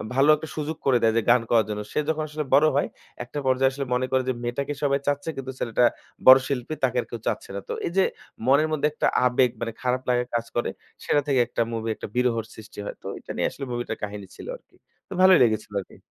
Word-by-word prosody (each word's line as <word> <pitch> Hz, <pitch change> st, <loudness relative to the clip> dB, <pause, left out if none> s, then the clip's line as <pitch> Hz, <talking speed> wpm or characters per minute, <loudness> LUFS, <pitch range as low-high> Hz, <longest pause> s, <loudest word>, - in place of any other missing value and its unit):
ভালো 135 Hz, +3 st, +4 dB
একটা 160 Hz, -, -7 dB
সুযোগ 155 Hz, +1 st, -3 dB
করে 130 Hz, -3 st, +4 dB
দেয় 110 Hz, -1 st, +4 dB
যে 115 Hz, -, +4 dB
গান 125 Hz, 0 st, +6 dB
করার 115 Hz, -3 st, +4 dB
জন্য। 105 Hz, 0 st, -3 dB
সে -, -, +1 dB
যখন 155 Hz, -1 st, 0 dB
আসলে 150 Hz, 0 st, -4 dB
বড় 150 Hz, +2 st, +6 dB
হয়, 145 Hz, -, +2 dB, 0.4 s
একটা 125 Hz, +4 st, -6 dB
পর্যায়ে 130 Hz, 0 st, +3 dB
আসলে 140 Hz, 0 st, -4 dB
মনে 125 Hz, +1 st, +1 dB
করে 130 Hz, -1 st, +2 dB
যে 130 Hz, -, +2 dB
মেয়েটাকে 140 Hz, +4 st, -2 dB
সবাই 140 Hz, 0 st, +2 dB
চাচ্ছে 145 Hz, +2 st, 0 dB
কিন্তু 130 Hz, -1 st, -4 dB
ছেলেটা 120 Hz, +1 st, +2 dB, 0.4 s
বড় 130 Hz, +1 st, +11 dB
শিল্পী 135 Hz, +2 st, -2 dB
তাকে 125 Hz, -1 st, +2 dB
আর -, -, -10 dB
কেউ 120 Hz, -, -5 dB
চাচ্ছে 105 Hz, -, -2 dB
না। -, -, -2 dB
তো -, -, -1 dB
এই -, -, -3 dB
যে 190 Hz, -, +6 dB, 0.4 s
মনের 140 Hz, +4 st, +5 dB
মধ্যে 150 Hz, 0 st, +2 dB
একটা -, -, +1 dB, 0.2 s
আবেগ, 125 Hz, 0 st, +3 dB
মানে 115 Hz, -1 st, -2 dB
খারাপ 125 Hz, 0 st, 0 dB
লাগা 125 Hz, 0 st, +2 dB
কাজ 115 Hz, 0 st, 0 dB
করে 120 Hz, -, 0 dB, 0.4 s
সেটা 145 Hz, -, +3 dB
থেকে 135 Hz, -3 st, +2 dB
একটা -, -, -2 dB
মুভি 115 Hz, 0 st, -3 dB
একটা -, -, -7 dB
বিরহর 120 Hz, -3 st, +1 dB
সৃষ্টি 110 Hz, -1 st, -12 dB
হয়। -, -, -5 dB
তো -, -, -7 dB
এইটা -, -, -9 dB
নিয়ে -, -, +2 dB
আসলে 140 Hz, -, -6 dB
মুভিটার 120 Hz, -2 st, -3 dB
কাহিনী 100 Hz, -1 st, -5 dB
ছিল -, -, -10 dB
আরকি। -, -, -31 dB, 0.3 s
তো -, -, -6 dB
ভালোই 185 Hz, -2 st, +7 dB
লেগেছিল 110 Hz, -2 st, 0 dB
আরকি। -, -, -16 dB
130 Hz, 240 wpm, -25 LUFS, 115-145 Hz, 0.4 s, বড়